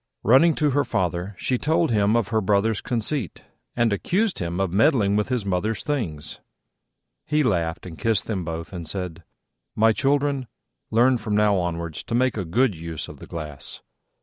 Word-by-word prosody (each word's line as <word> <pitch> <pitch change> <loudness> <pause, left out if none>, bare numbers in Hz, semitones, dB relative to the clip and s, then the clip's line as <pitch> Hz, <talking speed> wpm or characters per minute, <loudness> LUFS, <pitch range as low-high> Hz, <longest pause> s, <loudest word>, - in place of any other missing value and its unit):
Running 145 +9 +5
to 150 -2 +2
her 145 +2 +2
father, 90 -1 -2
she 125 +5 -1
told 160 -1 +1
him 105 0 +3
of 115 -2 +1
her 110 -1 +1
Brother's 100 +2 +1
conceit, 120 - -2 0.3
and 120 -3 +2
accused 190 - 0
him 85 +1 -3
of 95 -3 0
meddling 105 -2 +3
with 105 +3 0
his 125 -5 -1
mother's 100 +3 -1
things. 100 - -3 0.9
He 150 0 +2
laughed 85 -8 0
and 85 -3 -9
kissed 110 -3 +1
them 100 -5 -2
both, 80 +1 -5
and 85 -3 -6
said, 90 -1 -5 0.5
"My 110 +1 +4
children, 140 0 +1 0.4
learn 120 +2 +4
from 105 -1 -2
now 105 -1 +4
onwards 85 -3 -3
to 115 - -2
make 130 0 +2
a 100 -4 -3
good 110 +5 +2
use 80 -1 -6
of - - -11
the - - -11
glass. 75 -4 -6
105 Hz, 175 wpm, -24 LUFS, 90-125 Hz, 0.9 s, Running